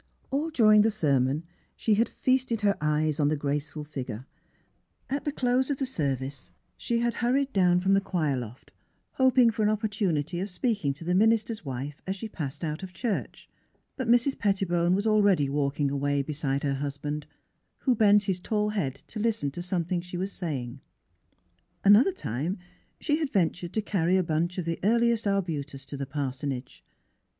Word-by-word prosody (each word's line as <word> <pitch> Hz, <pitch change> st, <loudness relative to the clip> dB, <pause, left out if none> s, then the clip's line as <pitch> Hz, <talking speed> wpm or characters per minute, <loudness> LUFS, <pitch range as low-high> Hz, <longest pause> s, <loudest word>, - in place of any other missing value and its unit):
All 290 Hz, +4 st, 0 dB
during 215 Hz, -8 st, +6 dB
the 220 Hz, -, +4 dB
sermon 140 Hz, -, +1 dB, 0.3 s
she 220 Hz, -, +1 dB
had 225 Hz, +3 st, +2 dB
feasted 255 Hz, -3 st, 0 dB
her 200 Hz, -1 st, +3 dB
eyes 150 Hz, 0 st, +1 dB
on 145 Hz, -, +3 dB
the 155 Hz, -, +2 dB
graceful 145 Hz, +2 st, -3 dB
figure. 130 Hz, -5 st, -6 dB, 0.9 s
At 280 Hz, +1 st, -2 dB
the 295 Hz, -, 0 dB
close 255 Hz, -1 st, +1 dB
of 285 Hz, -, 0 dB
the 270 Hz, -, -1 dB
service 135 Hz, -, -3 dB, 0.3 s
she 235 Hz, 0 st, -1 dB
had 235 Hz, 0 st, +1 dB
hurried 265 Hz, +3 st, +1 dB
down 180 Hz, -2 st, +4 dB
from 190 Hz, +1 st, +3 dB
the 195 Hz, -, +4 dB
choir 160 Hz, -8 st, 0 dB
loft, 125 Hz, 0 st, -8 dB, 0.4 s
hoping 255 Hz, -3 st, +4 dB
for 220 Hz, 0 st, -3 dB
an 210 Hz, -, +3 dB
opportunity 200 Hz, -7 st, -1 dB
of 195 Hz, +3 st, -2 dB
speaking 200 Hz, -, 0 dB
to 145 Hz, -, -10 dB
the 175 Hz, +2 st, 0 dB
minister's 220 Hz, +2 st, +2 dB
wife 140 Hz, +1 st, -5 dB
as 190 Hz, -, -1 dB
she 210 Hz, +3 st, -6 dB
passed 155 Hz, -8 st, -6 dB
out 155 Hz, +1 st, -3 dB
of 190 Hz, -1 st, -8 dB
church. 230 Hz, -5 st, -3 dB, 0.5 s
But 260 Hz, -4 st, -3 dB
Mrs. 245 Hz, +3 st, +3 dB
Pettibone 180 Hz, -4 st, +2 dB
was 200 Hz, +2 st, -1 dB
already 205 Hz, -8 st, +4 dB
walking 140 Hz, 0 st, 0 dB
away 140 Hz, 0 st, 0 dB
beside 140 Hz, -1 st, -2 dB
her 140 Hz, -1 st, +1 dB
husband, 145 Hz, +1 st, -4 dB, 0.5 s
who 260 Hz, -, +3 dB
bent 210 Hz, -2 st, +5 dB
his 190 Hz, -3 st, -1 dB
tall 210 Hz, +3 st, 0 dB
head 165 Hz, -11 st, -1 dB
to 215 Hz, -, -7 dB
listen 215 Hz, -10 st, 0 dB
to 175 Hz, -, -6 dB
something 175 Hz, -1 st, -1 dB
she 180 Hz, 0 st, -7 dB
was 190 Hz, +2 st, -2 dB
saying. 145 Hz, -11 st, -4 dB
18 -, -, -10 dB
THE -, -, -12 dB
HEART -, -, -33 dB
OF -, -, -44 dB
PHILUEA 170 Hz, -, -6 dB
Another 230 Hz, -, +6 dB
time 175 Hz, -, -3 dB, 0.4 s
she 295 Hz, -1 st, +1 dB
had 310 Hz, -4 st, -1 dB
ventured 175 Hz, -2 st, 0 dB
to 220 Hz, -, 0 dB
carry 185 Hz, -3 st, +1 dB
a 185 Hz, -, +2 dB
bunch 170 Hz, +2 st, -1 dB
of 180 Hz, -, -2 dB
the 165 Hz, 0 st, -2 dB
earliest 235 Hz, +1 st, +2 dB
arbutus 150 Hz, -8 st, -2 dB
to 145 Hz, -, -6 dB
the 140 Hz, -1 st, -4 dB
parsonage. 135 Hz, -2 st, -4 dB
180 Hz, 190 wpm, -27 LUFS, 145-215 Hz, 0.9 s, during